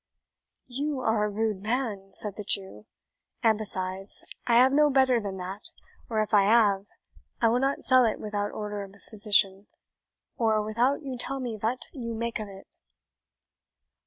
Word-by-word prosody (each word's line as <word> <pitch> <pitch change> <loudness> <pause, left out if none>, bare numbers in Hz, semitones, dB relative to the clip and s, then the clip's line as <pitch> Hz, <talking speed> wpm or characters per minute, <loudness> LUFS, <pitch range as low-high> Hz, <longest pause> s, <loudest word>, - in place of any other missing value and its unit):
"You 275 +2 -3
are 220 -3 +1
a - - -1
rude 210 -1 -2
man," 215 -3 -2
said 205 0 0
the 210 - -6
Jew; 190 - -3 0.6
"and, 225 -1 +5
besides, 195 -2 -2 0.2
I 235 -1 +5
ave 265 - +1
no 300 +1 +5
better 260 -3 +3
than 195 -2 -5
that 190 +3 -4 0.4
or 220 -2 +1
if 215 - -9
I 200 -1 +5
ave, 205 -3 +3 0.5
I 230 - +4
will 240 +2 +2
not 270 +2 -1
sell 255 -1 +5
it 220 - -1
without 205 -1 -3
order 210 -1 -5
of 195 0 -10
a - - -19
physician, 205 -2 +3 0.7
or 220 -2 +2
without 240 +7 0
you 265 -2 -5
tell 270 +2 -1
me 245 -4 -4
vat 225 +4 -1
you 235 -5 -5
make 230 0 -3
of 215 - -5
it." 195 -1 -12
215 Hz, 170 wpm, -27 LUFS, 200-245 Hz, 0.7 s, and